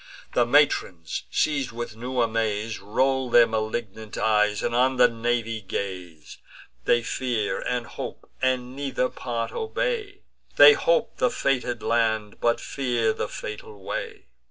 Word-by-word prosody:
The 120 Hz, -1 st, +3 dB
matrons, 120 Hz, -, +1 dB
seiz'd 140 Hz, -5 st, 0 dB
with 120 Hz, -1 st, -6 dB
new 125 Hz, +2 st, -2 dB
amaze, 110 Hz, -1 st, -1 dB
Roll 130 Hz, +6 st, 0 dB
their 120 Hz, 0 st, +7 dB
malignant 110 Hz, -1 st, -4 dB
eyes, 105 Hz, -1 st, +2 dB
and 120 Hz, -, -1 dB
on 130 Hz, +2 st, +2 dB
the 125 Hz, 0 st, +7 dB
navy 115 Hz, -1 st, -2 dB
gaze. 90 Hz, -6 st, -6 dB, 0.5 s
They 120 Hz, 0 st, +3 dB
fear, 120 Hz, -3 st, -1 dB
and 125 Hz, -1 st, -2 dB
hope, -, -, -8 dB
and 130 Hz, -1 st, 0 dB
neither 135 Hz, -2 st, -1 dB
part 115 Hz, -1 st, -4 dB
obey: 445 Hz, -3 st, -3 dB, 0.3 s
They 445 Hz, -, +10 dB
hope -, -, +1 dB
the 250 Hz, -, +2 dB
fated 125 Hz, -, -1 dB
land, 110 Hz, -3 st, 0 dB
but 120 Hz, 0 st, +2 dB
fear 120 Hz, -5 st, 0 dB
the -, -, -3 dB
fatal 105 Hz, -2 st, -8 dB
way. -, -, -5 dB
120 Hz, 135 wpm, -25 LUFS, 110-130 Hz, 0.5 s, They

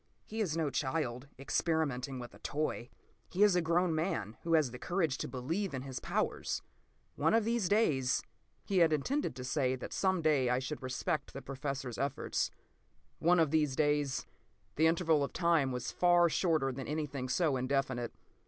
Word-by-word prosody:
He 220 Hz, +1 st, -4 dB
is 165 Hz, -6 st, 0 dB
no 155 Hz, -4 st, 0 dB
child, 130 Hz, -1 st, -2 dB
experimenting 140 Hz, -2 st, -1 dB
with 120 Hz, -1 st, -8 dB
a -, -, -15 dB
toy; 145 Hz, -5 st, -2 dB, 0.4 s
he 190 Hz, +3 st, +2 dB
is 205 Hz, -3 st, +5 dB
a 180 Hz, -, +3 dB
grown 170 Hz, +1 st, +2 dB
man 155 Hz, -, -2 dB
who 165 Hz, 0 st, +2 dB
has 150 Hz, -6 st, +3 dB
the 125 Hz, -, -8 dB
courage 170 Hz, -5 st, 0 dB
to -, -, -2 dB
believe 155 Hz, +7 st, -2 dB
in 130 Hz, -, -4 dB
his 135 Hz, -2 st, -5 dB
powers. -, -, -2 dB, 0.5 s
One -, -, +3 dB
of 225 Hz, -2 st, +3 dB
these 230 Hz, -5 st, +1 dB
days...." 145 Hz, -, +2 dB, 0.4 s
He 195 Hz, -2 st, +1 dB
had 165 Hz, -2 st, +5 dB
intended 265 Hz, -, -1 dB
to 125 Hz, -, -6 dB
say 130 Hz, 0 st, +1 dB
that 130 Hz, -, -7 dB
some 190 Hz, -3 st, +1 dB
day 145 Hz, -5 st, +3 dB
I 125 Hz, -, +2 dB
should 135 Hz, +4 st, -4 dB
respect 130 Hz, +2 st, -2 dB
the 135 Hz, -, -6 dB
Professor's 135 Hz, -2 st, -4 dB
efforts. 140 Hz, 0 st, -1 dB, 0.7 s
One 175 Hz, +2 st, +4 dB
of 160 Hz, -3 st, +3 dB
these 150 Hz, -4 st, +2 dB
days! 145 Hz, -2 st, +1 dB, 0.5 s
The 160 Hz, +2 st, +4 dB
interval 160 Hz, -3 st, +3 dB
of 140 Hz, -, -4 dB
time 165 Hz, -6 st, +2 dB
was 125 Hz, -1 st, -3 dB
far 175 Hz, -1 st, +4 dB
shorter 155 Hz, -6 st, +1 dB
than 130 Hz, 0 st, -6 dB
anything 145 Hz, -4 st, -3 dB
so 155 Hz, 0 st, +2 dB
indefinite. 130 Hz, -2 st, -1 dB
150 Hz, 180 wpm, -33 LUFS, 130-170 Hz, 0.7 s, is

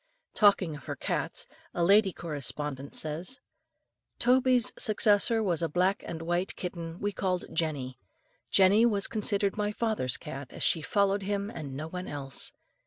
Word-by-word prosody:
Talking 200 Hz, -6 st, +3 dB
of 145 Hz, -, -11 dB
her -, -, -4 dB
cats, -, -, -2 dB, 0.3 s
a 175 Hz, -, +1 dB
lady 200 Hz, +2 st, +5 dB
correspondent 145 Hz, -3 st, -5 dB
says: 165 Hz, -, -1 dB, 0.8 s
"Toby's 250 Hz, -1 st, +3 dB
successor 215 Hz, +1 st, +3 dB
was 175 Hz, -5 st, +1 dB
a 165 Hz, -, 0 dB
black 185 Hz, +5 st, +1 dB
and 165 Hz, -1 st, -5 dB
white 175 Hz, +3 st, -1 dB
kitten 170 Hz, -1 st, -6 dB
we 205 Hz, -, -1 dB
called 185 Hz, -2 st, -2 dB
Jenny. 145 Hz, -6 st, -2 dB, 0.5 s
Jenny 195 Hz, +3 st, +5 dB
was 210 Hz, -4 st, +2 dB
considered 205 Hz, -2 st, +2 dB
my 210 Hz, 0 st, 0 dB
father's 210 Hz, -, -1 dB
cat, 135 Hz, 0 st, -8 dB
as -, -, -3 dB
she 165 Hz, -, +4 dB
followed 200 Hz, +5 st, +1 dB
him 200 Hz, +1 st, -2 dB
and 145 Hz, -8 st, -7 dB
no 155 Hz, +3 st, -5 dB
one 180 Hz, +2 st, -6 dB
else. 135 Hz, -2 st, -2 dB
185 Hz, 155 wpm, -29 LUFS, 155-205 Hz, 0.8 s, lady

